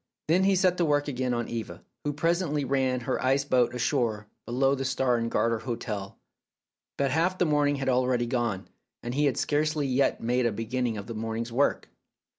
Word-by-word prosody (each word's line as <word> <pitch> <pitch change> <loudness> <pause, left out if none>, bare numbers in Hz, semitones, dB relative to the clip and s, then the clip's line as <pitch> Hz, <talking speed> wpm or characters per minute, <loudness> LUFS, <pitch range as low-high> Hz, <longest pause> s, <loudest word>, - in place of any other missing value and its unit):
Then 180 +4 +3
he 195 0 +4
set 185 -1 +2
to 175 - +2
work 145 -1 +1
again 130 -2 -1
on 120 -1 -1
Eva, 115 -2 -6 0.2
who 145 - -1
presently 155 -1 0
ran 130 -1 0
her 130 +2 -2
ice 135 +2 +2
boat 125 -3 +2
ashore 120 -4 0 0.2
below 135 +3 +2
the 135 -1 -2
Star 130 -1 +1
and 115 0 -1
Garter 115 -1 +1
hotel. 105 -5 -5 0.8
But 140 -2 +1
half 170 +5 +1
the 180 - +2
morning 145 -2 +2
had 135 -1 -3
already 125 -1 +2
gone, 120 -6 -2 0.4
and 120 - -4
he 145 +3 +2
had 140 - +1
scarcely 150 0 0
yet 135 +1 +1
made 120 +1 +1
a - - 0
beginning 115 +1 -2
of 100 - -6
the 115 - -6
morning's 115 +1 -4
work. 135 +5 +1
130 Hz, 195 wpm, -27 LUFS, 120-145 Hz, 0.8 s, he